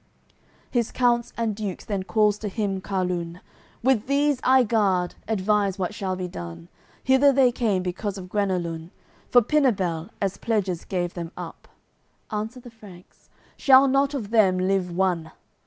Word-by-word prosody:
CCLXXXVIII -, -, -36 dB
His 240 Hz, -3 st, 0 dB
counts 240 Hz, -2 st, +1 dB
and 225 Hz, -3 st, -1 dB
Dukes 205 Hz, -4 st, -5 dB
then 200 Hz, -3 st, -2 dB
calls 210 Hz, +1 st, +2 dB
to 215 Hz, -, -4 dB
him 200 Hz, -2 st, -2 dB
Carlun: 180 Hz, -3 st, -3 dB, 0.4 s
"With 250 Hz, -3 st, +2 dB
these 285 Hz, 0 st, +2 dB
I 260 Hz, 0 st, +5 dB
guard, 195 Hz, -6 st, +1 dB
advise 205 Hz, -2 st, +1 dB
what 190 Hz, +1 st, -2 dB
shall 190 Hz, -3 st, -3 dB
be 185 Hz, -1 st, -4 dB
done. 85 Hz, -, -8 dB, 0.3 s
Hither 265 Hz, +2 st, +5 dB
they 265 Hz, -2 st, +4 dB
came 215 Hz, -6 st, 0 dB
because 195 Hz, +3 st, -3 dB
of 185 Hz, -1 st, -8 dB
Guenelun; 180 Hz, -5 st, -2 dB, 0.4 s
For 245 Hz, -1 st, +6 dB
Pinabel, 195 Hz, -, +1 dB
as 195 Hz, -1 st, -1 dB
pledges 195 Hz, -7 st, -1 dB
gave 175 Hz, -2 st, -2 dB
them 170 Hz, -2 st, -6 dB
up." -, -, -9 dB, 0.6 s
Answer 220 Hz, +4 st, -4 dB
the 245 Hz, -, -12 dB
Franks: 200 Hz, -6 st, -16 dB, 0.3 s
"Shall 270 Hz, 0 st, +6 dB
not 275 Hz, +2 st, +2 dB
of 220 Hz, -6 st, -5 dB
them 200 Hz, -5 st, +4 dB
live 185 Hz, 0 st, 0 dB
one." 175 Hz, -3 st, -1 dB
200 Hz, 155 wpm, -24 LUFS, 180-235 Hz, 0.6 s, For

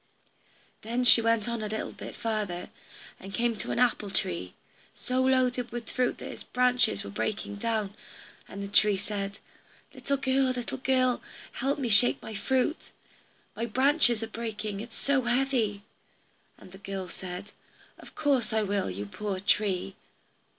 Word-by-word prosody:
Then 235 Hz, +3 st, -1 dB
she 240 Hz, -1 st, +8 dB
went 230 Hz, -1 st, +2 dB
on 235 Hz, -1 st, -2 dB
a 215 Hz, -, -2 dB
little 220 Hz, +1 st, -3 dB
bit -, -, -9 dB
farther, 210 Hz, -6 st, -2 dB, 0.5 s
and 195 Hz, 0 st, -7 dB
came 235 Hz, +1 st, +1 dB
to -, -, -4 dB
an -, -, -1 dB
apple 235 Hz, -4 st, +2 dB
tree, 90 Hz, -, -2 dB, 0.4 s
so 255 Hz, +1 st, 0 dB
loaded 255 Hz, -2 st, +2 dB
with 235 Hz, -1 st, -6 dB
fruit 250 Hz, -1 st, +1 dB
that -, -, -7 dB
its -, -, -9 dB
branches 250 Hz, -, +2 dB
were 100 Hz, -, -7 dB
breaking 200 Hz, -, -2 dB
down, 215 Hz, -2 st, -1 dB, 0.5 s
and 200 Hz, -, -6 dB
the -, -, -4 dB
tree 205 Hz, 0 st, +4 dB
said, 200 Hz, 0 st, -4 dB, 0.6 s
"Little 280 Hz, 0 st, -1 dB
girl, 265 Hz, 0 st, +2 dB
little 255 Hz, 0 st, -2 dB
girl, 255 Hz, -1 st, +2 dB, 0.3 s
help 275 Hz, +3 st, -1 dB
me 270 Hz, -4 st, -1 dB
shake 230 Hz, +3 st, +5 dB
my 220 Hz, -, -8 dB
fruit. 260 Hz, +8 st, 0 dB, 0.7 s
My 230 Hz, -, -2 dB
branches 260 Hz, -1 st, +3 dB
are -, -, -3 dB
breaking, 215 Hz, -3 st, -4 dB
it 230 Hz, +3 st, -6 dB
is -, -, -10 dB
so 280 Hz, -1 st, +2 dB
heavy." 240 Hz, -5 st, +1 dB, 0.7 s
And 185 Hz, -, -14 dB
the 190 Hz, -, -12 dB
girl 195 Hz, -2 st, -5 dB
said, 185 Hz, +3 st, -7 dB, 0.5 s
"Of -, -, -14 dB
course 280 Hz, -5 st, +1 dB
I 220 Hz, -1 st, +2 dB
will, 200 Hz, -, 0 dB
you 95 Hz, +3 st, -4 dB
poor 195 Hz, -, -4 dB
tree." 195 Hz, -2 st, +1 dB
225 Hz, 165 wpm, -29 LUFS, 200-250 Hz, 0.7 s, she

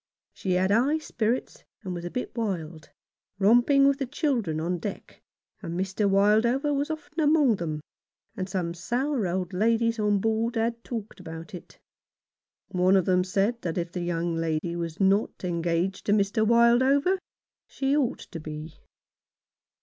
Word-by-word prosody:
She 185 Hz, -, -2 dB
had 185 Hz, +2 st, +2 dB
high 260 Hz, +9 st, +3 dB
spirits, 240 Hz, -5 st, -2 dB, 0.2 s
and 185 Hz, -3 st, -4 dB
was 175 Hz, -1 st, -6 dB
a -, -, -3 dB
bit 250 Hz, -, -5 dB
wild, 175 Hz, -9 st, -4 dB, 0.5 s
romping 240 Hz, +7 st, +5 dB
with 280 Hz, 0 st, +2 dB
the 270 Hz, -, -2 dB
children 240 Hz, -, -1 dB
on 175 Hz, +2 st, -2 dB
deck, -, -, -7 dB, 0.4 s
and 170 Hz, +2 st, -4 dB
Mr. 190 Hz, +2 st, 0 dB
Wildover 220 Hz, +9 st, +3 dB
was 285 Hz, +3 st, -1 dB
often 320 Hz, +2 st, -6 dB
among 295 Hz, -7 st, +4 dB
them, 155 Hz, -3 st, -4 dB, 0.5 s
and 185 Hz, 0 st, -4 dB
some 180 Hz, -3 st, -2 dB
sour 245 Hz, -, -1 dB
old 180 Hz, +1 st, -2 dB
ladies 230 Hz, +3 st, +1 dB
on 210 Hz, -1 st, +2 dB
board 225 Hz, +3 st, 0 dB
had 230 Hz, +1 st, -1 dB
talked 225 Hz, -4 st, -6 dB
about 165 Hz, +2 st, -9 dB
it. 180 Hz, -, -10 dB, 0.9 s
One 185 Hz, +1 st, +3 dB
of 185 Hz, -, +2 dB
them 180 Hz, -1 st, +3 dB
said 200 Hz, +6 st, 0 dB
that 170 Hz, -1 st, -3 dB
if 170 Hz, -1 st, -2 dB
the 180 Hz, -, -4 dB
young 170 Hz, 0 st, -1 dB
lady 165 Hz, +1 st, -1 dB
was 170 Hz, 0 st, -4 dB
not 195 Hz, +1 st, +1 dB
engaged 175 Hz, +2 st, -1 dB
to 205 Hz, -, +4 dB
Mr. 210 Hz, +1 st, +2 dB
Wildover 260 Hz, -, +4 dB, 0.5 s
she 275 Hz, +1 st, 0 dB
ought 280 Hz, -5 st, 0 dB
to 170 Hz, -, -6 dB
be. 155 Hz, 0 st, -8 dB
200 Hz, 155 wpm, -26 LUFS, 175-240 Hz, 0.9 s, romping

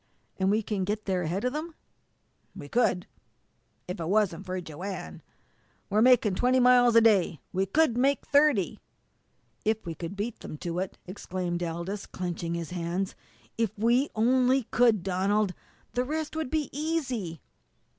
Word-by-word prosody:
"And 190 Hz, 0 st, +2 dB
we 215 Hz, +2 st, +2 dB
can 205 Hz, -2 st, -2 dB
get 210 Hz, +3 st, -2 dB
there 185 Hz, -2 st, 0 dB
ahead 175 Hz, +4 st, -2 dB
of 250 Hz, -, 0 dB
them?" 310 Hz, +2 st, -5 dB, 0.8 s
"We 145 Hz, -, -8 dB
could 180 Hz, -2 st, +1 dB, 0.8 s
if 180 Hz, +2 st, -5 dB
it 165 Hz, 0 st, -3 dB
wasn't 195 Hz, -3 st, +1 dB
for 185 Hz, 0 st, -2 dB
Joanne. 170 Hz, -, -7 dB, 0.7 s
We're 210 Hz, +2 st, +3 dB
makin' 240 Hz, -4 st, +5 dB
twenty 250 Hz, +6 st, +3 dB
miles 245 Hz, -1 st, +5 dB
a 230 Hz, -, +8 dB
day. 195 Hz, -8 st, +3 dB
We 190 Hz, +1 st, +1 dB
could 305 Hz, +3 st, +3 dB
make 275 Hz, +2 st, +2 dB
thirty." 285 Hz, -, +3 dB, 0.8 s
"If 220 Hz, 0 st, 0 dB
we 170 Hz, -, -4 dB
could 165 Hz, +4 st, -6 dB
beat 210 Hz, +3 st, -4 dB
them 155 Hz, -, -8 dB
to 170 Hz, +2 st, -3 dB
it!" 190 Hz, 0 st, -4 dB
exclaimed 180 Hz, -2 st, -4 dB
Aldous, 170 Hz, +4 st, -4 dB
clenching 170 Hz, -2 st, -4 dB
his 170 Hz, -1 st, -5 dB
hands. 180 Hz, +2 st, -2 dB, 0.5 s
"If 225 Hz, -4 st, 0 dB
we 240 Hz, +6 st, +3 dB
only 255 Hz, +3 st, +3 dB
could, 230 Hz, -6 st, +4 dB
Donald 195 Hz, +1 st, +1 dB, 0.4 s
the 250 Hz, -, +1 dB
rest 310 Hz, +3 st, -3 dB
would 315 Hz, -4 st, -2 dB
be 305 Hz, -2 st, -1 dB
easy!" 260 Hz, -, -2 dB
205 Hz, 155 wpm, -28 LUFS, 180-250 Hz, 0.8 s, a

